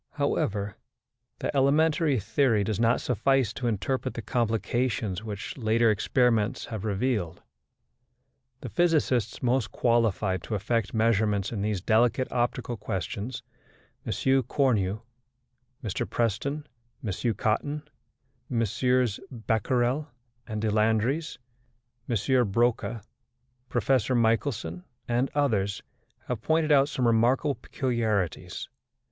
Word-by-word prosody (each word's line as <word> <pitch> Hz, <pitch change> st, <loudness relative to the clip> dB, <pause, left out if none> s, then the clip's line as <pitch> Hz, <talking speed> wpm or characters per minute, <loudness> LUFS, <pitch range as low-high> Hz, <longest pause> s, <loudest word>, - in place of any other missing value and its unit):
However, 100 Hz, -1 st, -1 dB, 0.6 s
the -, -, -3 dB
elementary 150 Hz, 0 st, +3 dB
theory 110 Hz, +1 st, +2 dB
does 105 Hz, +1 st, -2 dB
not 115 Hz, +1 st, +3 dB
suffice 125 Hz, 0 st, +1 dB
to 125 Hz, -, -3 dB
interpret 130 Hz, +4 st, -1 dB
the 115 Hz, -, -5 dB
complications 115 Hz, -3 st, -1 dB
which 105 Hz, -2 st, -6 dB
later 115 Hz, 0 st, +3 dB
experiments 115 Hz, 0 st, +1 dB
have 110 Hz, -3 st, -6 dB
revealed. 105 Hz, -4 st, -1 dB, 1.2 s
The 125 Hz, -, -6 dB
physicists 135 Hz, -9 st, +1 dB
most 125 Hz, -2 st, +1 dB
qualified 110 Hz, -6 st, +1 dB
to 110 Hz, -, -4 dB
effect 110 Hz, +2 st, -1 dB
measurements 110 Hz, -3 st, +2 dB
in 105 Hz, -4 st, -3 dB
these 105 Hz, -2 st, -1 dB
delicate 120 Hz, +5 st, +2 dB
optical 120 Hz, -1 st, -1 dB
questions 105 Hz, +3 st, -4 dB, 0.6 s
M. -, -, -4 dB, 0.3 s
Cornu, 110 Hz, -6 st, +1 dB, 0.8 s
Mr 105 Hz, -5 st, -3 dB
Preston, 130 Hz, +7 st, -1 dB, 0.4 s
M. 110 Hz, +3 st, -1 dB
Cotton, 145 Hz, +8 st, -1 dB, 0.6 s
MM. 125 Hz, 0 st, +1 dB
Becquerel 120 Hz, +4 st, 0 dB, 0.4 s
and 110 Hz, -2 st, -4 dB
Deslandres, 110 Hz, +8 st, +1 dB, 0.7 s
M. 120 Hz, +2 st, +2 dB
Broca, 115 Hz, 0 st, 0 dB, 0.7 s
Professor 130 Hz, -1 st, +1 dB
Michelson, 115 Hz, -, 0 dB, 0.2 s
and 120 Hz, +3 st, +1 dB
others 105 Hz, -9 st, +1 dB, 0.4 s
have 120 Hz, -3 st, -3 dB
pointed 160 Hz, +1 st, +2 dB
out 140 Hz, 0 st, +5 dB
some 130 Hz, -4 st, -1 dB
remarkable 120 Hz, +5 st, +3 dB
peculiarities. 110 Hz, -, -2 dB
115 Hz, 105 wpm, -27 LUFS, 105-130 Hz, 1.2 s, out